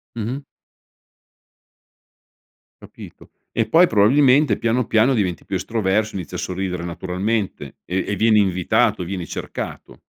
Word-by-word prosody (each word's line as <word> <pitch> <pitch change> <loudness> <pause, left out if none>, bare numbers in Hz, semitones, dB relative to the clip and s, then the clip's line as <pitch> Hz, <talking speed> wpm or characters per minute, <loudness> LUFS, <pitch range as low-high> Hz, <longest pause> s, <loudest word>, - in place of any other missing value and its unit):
Mh-mh. 120 +5 -4 2.4
Capito. - - -14 0.2
E 115 - 0
poi 170 +10 +5
probabilmente, 135 +6 +4
piano, 115 +1 0
piano, 115 +4 +3
diventi 95 -8 -1
più 95 - -3
estroverso 110 +1 -1
e 95 - -4
inizi 90 - -8
a - - -2
sorridere 90 -1 -4
naturalmente, 95 +4 -3
e 95 +1 -2
e 105 - -1
vieni 110 0 +4
invitato, 95 +2 +1
vieni 90 -1 -5
cercato. - - -7
105 Hz, 125 wpm, -21 LUFS, 95-115 Hz, 2.4 s, poi